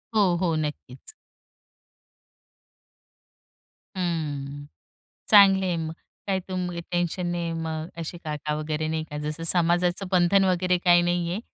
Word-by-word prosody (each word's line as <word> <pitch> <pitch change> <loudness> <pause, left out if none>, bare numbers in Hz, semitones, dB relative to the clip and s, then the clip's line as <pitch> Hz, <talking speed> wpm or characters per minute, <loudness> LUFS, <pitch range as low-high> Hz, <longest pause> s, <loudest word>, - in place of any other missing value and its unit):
हो, 195 -5 +4
हो, 170 -3 +1
नक्कीच. 150 -4 -5 2.8
हं, 145 -5 -3 0.6
चांगले 195 -3 +7
आहे 175 - 0
मग. 160 0 -4 0.4
काय 190 -1 +1
तुम्ही 180 -2 -3
टेन्शन 175 0 -1
नाही, 170 -1 -2
मग 160 -1 -4
अशी 170 +1 -5
काका 150 -1 -3
वगैरे 155 0 -2
नाही 160 0 -2
का, 150 -1 -8
जसं 150 +2 -4
समाजाचं 175 +2 +2
बंधन 185 +2 +4
वगैरे 180 0 +2
काही 175 -1 +4
नाही 175 0 0
आहे 200 - -3
170 Hz, 125 wpm, -25 LUFS, 155-180 Hz, 2.8 s, चांगले